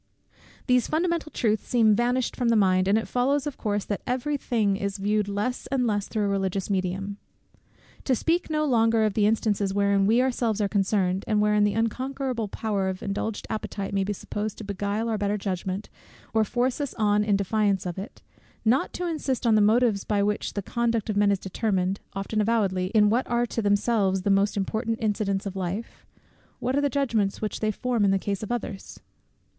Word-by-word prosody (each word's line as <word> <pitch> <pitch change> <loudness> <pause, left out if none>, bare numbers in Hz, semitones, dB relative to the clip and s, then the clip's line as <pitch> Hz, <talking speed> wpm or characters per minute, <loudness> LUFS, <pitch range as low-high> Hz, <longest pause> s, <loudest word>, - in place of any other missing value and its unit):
These 250 -1 +3
fundamental 335 0 -1
truths 220 -2 0
seem 225 -4 +4
vanished 245 +2 0
from 245 -2 0
the 230 - +4
mind, 185 -3 +3
and 200 +2 +4
it 225 - -2
follows 270 +3 +1
of 290 -2 -4
course, 205 -2 -2
that 205 - -3
every 260 +4 -1
thing 220 -7 0
is 200 +1 -3
viewed 205 +1 0
less 205 +5 -2
and 260 -2 0
less 205 -3 0
through 215 -2 -1
a - - +1
religious 195 0 -1
medium. 195 +1 -2 0.9
To 260 - +3
speak 335 +8 0
no 305 -1 +1
longer 230 -4 +3
of 210 -2 -1
instances 210 -2 +1
wherein 200 -1 +3
we 225 +3 +4
ourselves 240 -4 +1
are 205 - +2
concerned, 195 -2 +1
and 215 -1 +2
wherein 210 0 +3
the 205 - 0
unconquerable 255 +1 -2
power 200 -2 -1
of 185 0 -5
indulged 205 +2 -3
appetite 200 -2 -4
may 195 -1 +1
be 200 - -2
supposed 205 +1 -4
to - - -7
beguile 205 +2 -2
our 220 -2 -1
better 205 +1 0
judgment, 190 0 -3 0.5
or 220 -1 +4
force 245 +5 -1
us 285 - -4
on 210 -1 +2
in 210 -1 +2
defiance 200 -1 +1
of 180 +1 -4
it; 200 - -9 0.4
not 245 +5 +2
to 360 - -3
insist 290 -7 -2
on 230 - +4
the 215 - +5
motives 215 -1 +3
by 205 -2 +1
which 210 0 -1
the 200 - -3
conduct 230 -1 -1
of - - -4
men 205 0 +4
is 200 - +2
determined, 190 -1 -1
often 195 +2 -1
avowedly, 200 -5 +1
in 210 -1 +5
what 245 +3 +1
are 240 0 +1
to 230 - -3
themselves 205 -2 +1
the 200 - +2
most 200 +1 +2
important 220 +3 -1
incidents 205 -2 -1
of 195 -1 -5
life; 190 +4 -5 0.5
what 255 +2 -1
are 285 - +2
the 285 - +2
judgments 235 -7 0
which 215 - -3
they 215 - 0
form 235 +1 0
in 200 - +4
the 195 - +3
case 200 0 -3
of 215 - -5
others? 210 -5 -5
210 Hz, 200 wpm, -26 LUFS, 200-235 Hz, 0.9 s, the